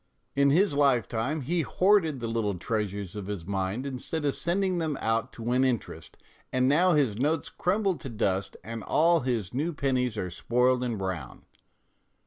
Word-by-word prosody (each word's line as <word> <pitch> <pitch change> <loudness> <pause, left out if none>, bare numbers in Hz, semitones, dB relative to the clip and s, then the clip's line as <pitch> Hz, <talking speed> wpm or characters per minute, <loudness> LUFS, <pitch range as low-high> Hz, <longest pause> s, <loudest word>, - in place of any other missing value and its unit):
In 140 0 +4
his 170 +3 +3
lifetime 135 0 +1
he 165 +6 0
hoarded 180 -5 +2
the 115 - -3
little 110 -3 -1
treasures 100 0 -3
of 100 -2 -6
his 100 -5 -5
mind 95 +6 -2
instead 140 +3 -4
of 140 - +2
sending 185 +1 0
them 155 -4 -1
out 115 +2 0
to 115 - -9
win 125 +3 +2
interest, 125 -5 -3 0.3
and 130 0 +2
now 170 +6 +4
his 135 -9 +2
notes 155 +4 0
crumble 195 +3 0
to 135 - -7
dust 100 -4 -1
and 115 -1 -6
all 170 +2 +3
his 120 - -2
new 155 +7 -1
pennies 130 -5 0
are 90 -3 -3
spoiled 125 +6 +1
and 120 -3 -2
brown. 95 -9 -5
125 Hz, 170 wpm, -28 LUFS, 110-155 Hz, 0.3 s, In